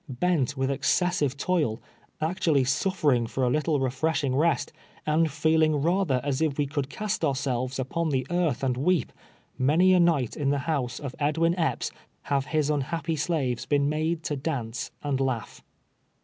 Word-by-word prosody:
I>ent 145 -7 +1
with 135 +1 0
excessive 145 +1 +1
toil 150 -10 0 0.2
— - - -32
actually 160 -4 +2
suffering 135 -3 +1
for 130 - -2
a 125 - +2
little 150 +1 +1
refreshing 135 +1 0
rest, 165 +4 +1 0.3
and 155 +1 +2
feeling 155 +1 +2
rather 165 -2 +1
as 140 0 -1
if 155 -4 0
we 145 - +1
could 140 -1 -3
cast 210 +5 -3
ourselves 130 -3 -1
u])on 160 +6 -1
the 130 -3 0
earth 170 -7 0
and 125 -2 0
weep, 155 0 +1 0.5
many 160 +8 +4
a 180 - +5
night 160 -9 +2
in 140 -2 0
the 145 - +2
house 140 -7 -1
of 140 -3 -6
Edwin 160 +3 +2
Epps 165 -3 -1 0.3
have 140 -1 0
his 155 -2 +1
unhappy 165 +3 -1
slaves 135 -6 -1
been 140 0 +2
made 160 +2 -1
to 145 - -2
dance 130 -6 -3
and 140 -2 -1
laugh. 130 -4 -3
145 Hz, 165 wpm, -26 LUFS, 130-165 Hz, 0.5 s, a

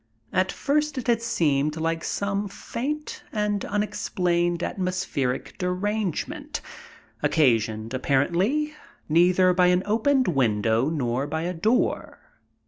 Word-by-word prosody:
At 185 0 +2
first 300 0 0
it 255 - -3
had 235 -2 +2
seemed 150 -8 +1
like 165 0 -1
some 200 0 -1
faint 285 +9 -5
and 210 -2 -1
unexplained 175 -4 0
atmospheric 180 -10 -2
derangement, 190 +1 -2 0.6
occasioned, 115 -5 +2
apparently, 180 - +1 0.3
neither 180 +3 +4
by 180 0 +4
an 180 +1 +3
opened 255 +5 +2
window 115 -3 +2
nor 135 -3 -1
by 160 +1 -2
a 180 +1 -2
door. 215 +9 0
180 Hz, 110 wpm, -25 LUFS, 150-210 Hz, 0.6 s, neither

